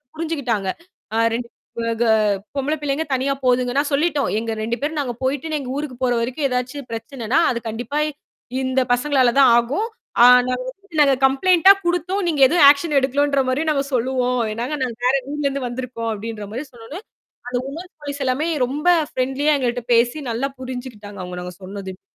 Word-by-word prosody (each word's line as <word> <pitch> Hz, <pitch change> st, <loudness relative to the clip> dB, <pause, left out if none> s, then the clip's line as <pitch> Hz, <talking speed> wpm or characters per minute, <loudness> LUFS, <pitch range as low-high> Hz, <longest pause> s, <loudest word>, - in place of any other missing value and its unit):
புரிஞ்சுக்கிட்டாங்க. 275 Hz, -12 st, -2 dB, 0.5 s
ஆ -, -, +1 dB, 0.2 s
2 235 Hz, +1 st, -3 dB, 0.5 s
கே 235 Hz, -, +3 dB, 0.5 s
பொம்பள 275 Hz, +2 st, 0 dB
பிள்ளைகள் 290 Hz, +1 st, -2 dB
தனியா 265 Hz, +1 st, +1 dB
போதுங்கன்னு. 250 Hz, +1 st, +2 dB
நாங்க 290 Hz, +1 st, 0 dB
சொல்லிட்டோம். 295 Hz, -1 st, +1 dB
எங்க 230 Hz, 0 st, -3 dB
2 230 Hz, +2 st, -1 dB
பேரும் 300 Hz, +1 st, -2 dB
நாங்க 255 Hz, -4 st, -2 dB
போய்ட்டு 290 Hz, +4 st, -1 dB
எங்க 260 Hz, -, -7 dB
ஊருக்கு 290 Hz, -4 st, -4 dB
போற 245 Hz, -, +2 dB
வரைக்கும் 255 Hz, +5 st, -1 dB
ஏதாவது 250 Hz, +3 st, -2 dB
பிரச்சனைன்னா, 230 Hz, +4 st, -2 dB
அது 235 Hz, -, -2 dB
கண்டிப்பா 245 Hz, +7 st, -3 dB, 0.6 s
இந்த 260 Hz, 0 st, 0 dB
பசங்களால 255 Hz, -2 st, +2 dB
தான் 265 Hz, -3 st, +7 dB
ஆகும். 275 Hz, -, 0 dB, 0.4 s
ஆ -, -, +10 dB, 0.2 s
நாங்க 255 Hz, 0 st, -1 dB
வந்துட்டு 335 Hz, +2 st, -7 dB
நாங்க 275 Hz, -2 st, +5 dB
கம்ப்ளெயிண்ட்டா 360 Hz, +7 st, +5 dB
குடுத்தோம். 355 Hz, +3 st, 0 dB
நீங்க 300 Hz, -4 st, 0 dB
எதுவும் 320 Hz, 0 st, +5 dB
ஆக்ஷன் 290 Hz, +1 st, +3 dB
எடுக்கலன்ற 280 Hz, +1 st, +1 dB
மாதிரியும் 305 Hz, +4 st, +1 dB
நாங்க 275 Hz, -1 st, 0 dB
சொல்லுவோம். 250 Hz, 0 st, 0 dB
ஏன்னா, 230 Hz, +3 st, -3 dB, 0.2 s
நாங்க 235 Hz, -3 st, -4 dB
வேற 260 Hz, +2 st, +4 dB, 0.2 s
ஊர்ல 295 Hz, -1 st, -3 dB
இருந்து 275 Hz, -2 st, -2 dB
வந்துருக்கோம் 240 Hz, -2 st, -4 dB
அப்படின்ற 215 Hz, 0 st, -6 dB
மாதிரி 255 Hz, +7 st, -5 dB
சொன்ன 230 Hz, -2 st, -14 dB
உடனே 335 Hz, +7 st, -7 dB, 0.5 s
அந்த 250 Hz, -, -1 dB
விமென் 330 Hz, +7 st, -8 dB
போலீஸ் 285 Hz, -1 st, -6 dB
எல்லாமே 260 Hz, +5 st, 0 dB, 0.2 s
ரொம்ப 295 Hz, +7 st, -4 dB, 0.3 s
பிரெண்ட்லியா 270 Hz, +4 st, +1 dB
எங்கள்ட்ட 245 Hz, -2 st, -2 dB
பேசி 235 Hz, +4 st, +3 dB
நல்லா 235 Hz, +4 st, -1 dB
புரிஞ்சி 255 Hz, 0 st, -6 dB
கிட்டாங்க 205 Hz, -1 st, -11 dB
அவங்க 180 Hz, 0 st, -6 dB
நாங்க 180 Hz, 0 st, -7 dB
சொன்னதையும். 190 Hz, -1 st, -8 dB
260 Hz, 175 wpm, -21 LUFS, 240-290 Hz, 0.6 s, ஆ